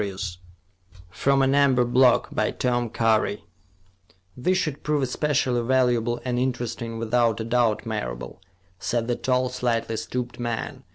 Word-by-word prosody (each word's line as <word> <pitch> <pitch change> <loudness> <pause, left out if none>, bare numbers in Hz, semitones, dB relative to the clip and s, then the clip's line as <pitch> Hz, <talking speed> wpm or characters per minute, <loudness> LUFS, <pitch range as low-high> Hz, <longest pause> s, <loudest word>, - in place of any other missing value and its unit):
] 90 0 -42 0.3
From 135 +7 +2
An 135 0 +3
Amber 135 -3 +4
Block 125 0 +4
By - - +1
Tom 120 -2 -1
Curry 110 -5 +1 0.9
"These 185 +9 +1
should 155 -6 -2
prove 150 -2 0
especially 130 -2 0
valuable 120 -1 +1
and 125 -1 0
interesting 120 -2 -3
without 115 -1 +1
a - - -2
doubt, 115 -2 +1
Marable," - - -5 0.4
said 115 -1 -1
the 120 - 0
tall, 130 0 0
slightly 115 -3 -1
stooped 120 +3 -4
man. 120 -2 -4
120 Hz, 135 wpm, -24 LUFS, 115-130 Hz, 0.9 s, Amber